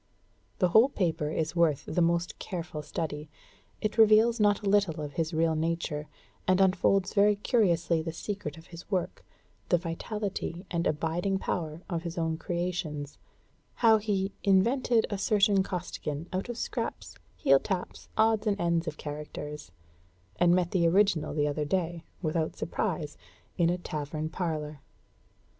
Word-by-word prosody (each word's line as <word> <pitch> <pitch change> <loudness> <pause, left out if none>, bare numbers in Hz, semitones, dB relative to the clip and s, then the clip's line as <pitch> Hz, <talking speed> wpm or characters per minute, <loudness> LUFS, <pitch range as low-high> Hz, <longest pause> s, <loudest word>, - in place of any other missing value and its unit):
The 180 - +3
whole 220 +9 +6
paper 165 - -1
is 160 +2 -2
worth 155 -4 +2
the 175 - 0
most 170 0 +1
careful 170 -4 -5
study; 150 -1 -4 0.5
it 215 +1 -2
reveals 220 +2 +6
not 205 0 +3
a - - -2
little 195 -5 +2
of 145 -1 -5
his 165 0 -1
real 160 0 +2
nature, 155 -2 -2 0.4
and 185 0 +4
unfolds 195 0 +3
very 205 0 +5
curiously 175 -7 +2
the 165 +1 -4
secret 165 -3 -5
of 165 - -13
his 170 - -10
work, 185 -4 -2 0.5
the 175 - +5
vitality 180 +1 -4
and 170 -1 0
abiding 165 +5 0
power 165 -3 -3
of 170 -3 -2
his 170 0 -6
own 160 -1 0
creations; 170 -5 -3 0.6
how 225 -2 +5
he 200 -2 -1
"invented 225 +4 +3
a 200 - -2
certain 200 -1 +3
Costigan, 170 -4 -4
out 190 +6 -2
of 240 - -4
scraps, - - -4 0.2
heel 135 0 +4
taps, 185 +3 -4
odds 220 0 +3
and 205 -1 +1
ends 170 -1 +1
of 155 -1 -4
characters," 150 - -7 0.7
and 175 0 +5
met 180 -2 +1
the 170 -3 +3
original 185 -4 +2
the 145 -1 +2
other 150 +1 -1
day, 170 +1 -1 0.2
without 160 0 -1
surprise, 160 -5 -3 0.4
in 170 -2 +3
a 175 - +1
tavern 155 -2 -4
parlor. 155 -4 -3
170 Hz, 150 wpm, -29 LUFS, 160-195 Hz, 0.7 s, whole